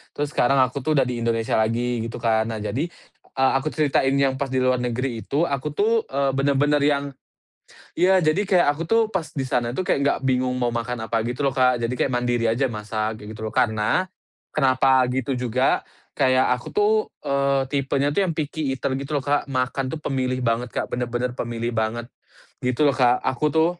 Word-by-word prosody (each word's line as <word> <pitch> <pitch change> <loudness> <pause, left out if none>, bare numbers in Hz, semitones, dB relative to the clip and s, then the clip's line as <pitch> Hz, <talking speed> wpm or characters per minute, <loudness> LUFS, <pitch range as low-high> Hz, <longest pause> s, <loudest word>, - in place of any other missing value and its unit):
Terus 145 0 -2
sekarang 135 +1 +2
aku 130 +2 -2
tuh 155 +3 0
udah 140 - +4
di 125 -1 -3
Indonesia 115 -1 0
lagi, 120 +2 0
gitu 115 - -7
kan. 110 -1 +2
Nah 110 -2 -4
jadi, 140 +9 -2 0.4
eee, 130 0 +1
aku 155 - -5
ceritain 140 -3 +1
yang 135 -1 +1
pas 140 - -1
di 130 -1 0
luar 130 0 +2
negeri 125 0 -2
itu, 145 +4 +1
aku 145 -2 -2
tuh, 225 +4 +1
eee, 140 0 0
bener-bener 140 +2 +2
yang 140 -1 +2 0.9
iya, 185 +3 +4
jadi 160 +4 +2
kayak 185 -5 +3
aku 165 - -4
tuh, 225 +7 +2
pas 190 -6 -2
di 135 -2 -3
sana 120 -2 0
itu, 160 - -2
kayak - - +2
nggak 140 - +1
bingung 125 0 +1
mau 120 - +1
makan 115 0 -3
apa 110 0 0
gitu, 125 +4 -1
lo, 135 - -2
Kak. 125 -1 +3
Jadi 120 +2 -2
kayak 130 - 0
mandiri 120 -1 0
aja 130 +4 +1
masak, 110 -1 -4
kayak 105 - -8
gitu, 110 0 -5
lo. - - -3
Karena, 110 +9 +2 0.5
kenapa 130 -1 +3
gitu 130 +2 -2
juga, 125 +1 +1 0.3
kayak 130 0 +2
aku - - -12
tuh, 210 +1 +3 0.3
eee, 140 0 +1
tipenya 140 0 0
tuh 175 - +1
yang 165 - -2
picky 155 -1 -3
eater 130 - -2
gitu 140 +2 -4
lo, 140 - -1
Kak. 145 0 0
Makan 130 0 -1
tuh 130 - -4
pemilih 130 -2 -1
banget, 115 +1 0
Kak, - - -2
bener-bener 120 0 -2
pemilih 120 -1 -3
banget, 115 +1 -2 0.5
gitu 125 +3 +1
lo, 140 - +4
Kak. 125 -2 +3
Aku 130 +4 0
tuh 165 +2 +2
130 Hz, 205 wpm, -23 LUFS, 120-140 Hz, 0.9 s, udah